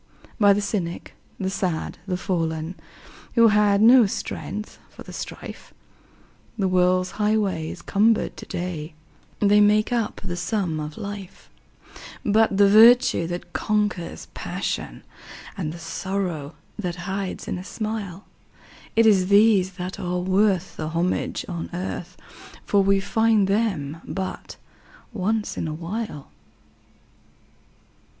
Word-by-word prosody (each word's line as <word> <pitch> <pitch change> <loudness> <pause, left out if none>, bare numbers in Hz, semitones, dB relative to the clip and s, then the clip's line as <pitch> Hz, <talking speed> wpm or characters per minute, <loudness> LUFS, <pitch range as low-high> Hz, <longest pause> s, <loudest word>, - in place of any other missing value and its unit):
By 205 -2 +6
the 205 - 0
cynic, 190 -4 -3 0.3
the 190 0 -1
sad, 185 -4 -2
the 180 -2 -1
fallen, 165 -3 -2 0.6
Who 230 -1 +7
had 210 -1 +4
no 240 -1 +8
strength 210 +2 -5
for - - -12
the - - -11
strife, - - -8 0.8
The 195 -3 +1
world's 185 0 +2
highway 205 -7 +1
is 170 - -9
cumbered 215 +2 +2
to - - -9
day 170 -3 -5 0.5
They 205 0 +5
make 210 +3 +3
up 230 -3 -1
the 180 -3 -4
sum 180 -3 -1
of 150 0 -6
life; 200 -3 -8 0.7
But 215 -1 +3
the 200 0 +6
virtue 225 -3 +6
that 175 +1 -6
conquers 210 -5 -1
passion, - - -4 0.5
And 165 -6 -3
the 170 - -8
sorrow 170 -3 -4 0.2
that 180 -4 -3
hides 190 0 -4
in 180 - -3
a - - -7
smile 210 -2 -5 0.7
It 230 0 +5
is 195 -4 +5
these 200 -2 +4
that 180 +1 -6
are 180 0 -2
worth 185 0 +1
the 155 - -3
homage 170 +3 -1
on 170 -3 -5
earth, 180 -1 -5 0.5
For 200 - +3
we 195 0 +3
find 220 0 +2
them 185 -8 -1
but 190 -1 -5 0.6
once 210 +2 -1
in - - -2
a 155 - -4
while. 170 -2 -5
195 Hz, 130 wpm, -24 LUFS, 175-210 Hz, 0.8 s, no